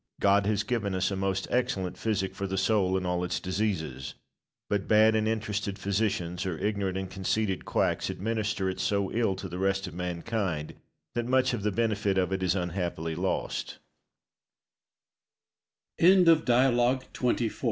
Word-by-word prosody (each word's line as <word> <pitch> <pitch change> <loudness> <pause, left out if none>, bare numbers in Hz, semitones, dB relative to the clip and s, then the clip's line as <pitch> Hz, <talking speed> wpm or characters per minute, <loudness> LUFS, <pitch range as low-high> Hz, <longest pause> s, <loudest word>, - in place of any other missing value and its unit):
God 100 0 +3
has 105 -1 +1
given 105 -4 -1
us 95 +1 0
a - - -1
most 95 0 -1
excellent 95 -7 0
physic 95 -4 -1
for 100 0 -4
the 95 0 -3
soul 95 -1 +2
in 95 - -3
all 90 0 0
its 90 0 -1
diseases, 90 -9 -2 0.5
but 100 -1 -1
bad 110 +1 +5
and 110 0 +1
interested 105 -2 -2
physicians, 95 -3 -1
or 90 -4 -3
ignorant 100 -2 -1
and 95 0 -3
conceited 95 +1 -1
quacks, - - 0
administer 105 -2 -1
it 95 - -3
so 100 -1 0
ill 115 -4 +1
to 95 - -6
the 90 0 -6
rest 95 0 +1
of 90 - -7
mankind 90 -2 -3 0.4
that 120 0 -2
much 130 0 +3
of 120 - -2
the 105 +1 0
benefit 105 -2 0
of 95 0 +1
it 95 - -2
is 95 0 +1
unha 90 0 -2
95 Hz, 145 wpm, -28 LUFS, 95-105 Hz, 0.5 s, bad